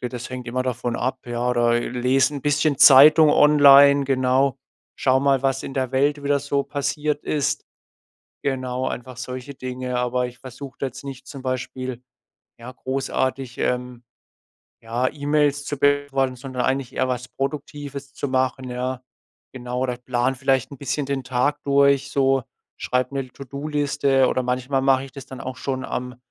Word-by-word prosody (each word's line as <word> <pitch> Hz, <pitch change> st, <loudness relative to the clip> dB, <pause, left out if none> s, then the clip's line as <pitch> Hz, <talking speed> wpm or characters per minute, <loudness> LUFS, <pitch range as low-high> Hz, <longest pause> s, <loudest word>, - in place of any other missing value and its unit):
Das 125 Hz, 0 st, -6 dB
hängt 125 Hz, -1 st, -6 dB
immer 130 Hz, +2 st, -1 dB
davon 120 Hz, -1 st, -3 dB
ab, 130 Hz, +2 st, -2 dB
ja? 120 Hz, +1 st, -2 dB
Oder, 120 Hz, -1 st, +2 dB
äh, 120 Hz, -, 0 dB
lese 130 Hz, +3 st, +2 dB
'n 140 Hz, -, -4 dB
bisschen 145 Hz, 0 st, +1 dB
Zeitung 150 Hz, +3 st, +8 dB
online, 140 Hz, -1 st, +7 dB
genau, 130 Hz, 0 st, +2 dB, 0.4 s
schaue 130 Hz, 0 st, +2 dB
mal, 140 Hz, -1 st, +2 dB
was 135 Hz, 0 st, 0 dB
in 135 Hz, -, -7 dB
der 130 Hz, -2 st, -1 dB
Welt 145 Hz, +2 st, +1 dB
wieder 140 Hz, 0 st, +2 dB
so 140 Hz, 0 st, -1 dB
passiert 145 Hz, +1 st, -2 dB
ist. 145 Hz, -2 st, -1 dB, 0.8 s
Genau, 130 Hz, -1 st, -2 dB
einfach 125 Hz, 0 st, -6 dB
solche 130 Hz, +2 st, -7 dB
Dinge. 125 Hz, -1 st, -4 dB
Aber 125 Hz, 0 st, 0 dB
ich 125 Hz, 0 st, -12 dB
versuche 130 Hz, 0 st, -10 dB
da 140 Hz, -, -1 dB
jetzt 135 Hz, -, -7 dB
nicht 135 Hz, -2 st, -8 dB
zum 140 Hz, -2 st, -9 dB
Beispiel, 130 Hz, -1 st, -4 dB, 0.6 s
ja, 125 Hz, +2 st, -9 dB
großartig, 130 Hz, -1 st, -3 dB
ähm, 125 Hz, -1 st, -2 dB, 0.8 s
ja, 120 Hz, +3 st, -1 dB
E-Mails 145 Hz, -1 st, +1 dB
zu 145 Hz, -1 st, -4 dB
beantworten, 145 Hz, -2 st, +1 dB
sondern 130 Hz, 0 st, -5 dB
eigentlich 130 Hz, -1 st, -1 dB
eher 130 Hz, -, +1 dB
was 125 Hz, -1 st, -3 dB
Produktives 140 Hz, 0 st, -5 dB
zu 145 Hz, -, -3 dB
machen, 130 Hz, -1 st, -1 dB
ja? 125 Hz, +1 st, -3 dB, 0.5 s
Genau, 125 Hz, 0 st, -4 dB
oder 125 Hz, -2 st, -2 dB
plane 125 Hz, +1 st, -1 dB
vielleicht 130 Hz, -1 st, 0 dB
'n 135 Hz, -, -10 dB
bisschen 140 Hz, +1 st, -2 dB
den 140 Hz, -2 st, -3 dB
Tag 130 Hz, +3 st, 0 dB
durch 140 Hz, 0 st, +3 dB
so, 135 Hz, -1 st, +2 dB, 0.4 s
schreibe 125 Hz, +1 st, -1 dB
'ne 135 Hz, -2 st, -3 dB
To-do-Liste, 140 Hz, 0 st, 0 dB
oder 130 Hz, -, 0 dB
manchmal 130 Hz, +2 st, -1 dB
mach 135 Hz, -1 st, +4 dB
ich 135 Hz, -, -10 dB
das 140 Hz, -, -10 dB
dann 130 Hz, -, -10 dB
auch 130 Hz, 0 st, -6 dB
schon 130 Hz, 0 st, -3 dB
am 125 Hz, 0 st, -5 dB
130 Hz, 165 wpm, -22 LUFS, 125-140 Hz, 0.8 s, Zeitung